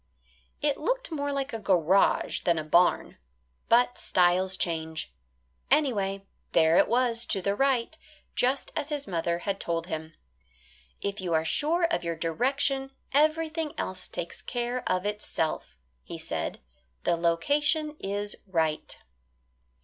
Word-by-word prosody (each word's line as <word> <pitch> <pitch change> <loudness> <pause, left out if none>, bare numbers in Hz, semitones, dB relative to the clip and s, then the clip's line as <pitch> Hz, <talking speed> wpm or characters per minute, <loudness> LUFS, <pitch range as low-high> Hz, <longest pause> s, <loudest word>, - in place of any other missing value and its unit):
It 290 -2 +1
looked - - -1
more 285 -2 -2
like 275 -1 -2
a 225 - -3
garage 190 -2 +3
than 170 -2 +2
a 155 - -1
barn. 175 +4 +2 0.5
But 245 +1 +4
styles 185 +1 +3
change. 160 - -3 0.6
Anyway, 205 -9 +1 0.3
there 160 +1 +5
it - - +5
was 235 0 +2
to 195 - 0
the 200 +2 0
right, 265 +3 +1 0.4
just 260 +3 +1
as 305 -2 -2
his 290 -2 -3
mother 170 -1 -1
had 200 -1 -1
told 165 -1 -2
him. 160 -2 -6 0.9
"If 200 0 -3
you 175 -3 0
are 160 0 +1
sure 315 - +2
of 335 - +1
your 170 -1 -2
direction 270 - 0 0.2
everything 310 +1 +1
else 185 0 -4
takes 175 - -5
care 245 +1 -2
of 185 +1 0
itself," 160 - -2 0.2
he - - -8
said. - - -4 0.4
"The - - +2
location 290 - +1
is 205 +1 -2
right." 160 -4 -1
205 Hz, 135 wpm, -28 LUFS, 170-280 Hz, 0.9 s, there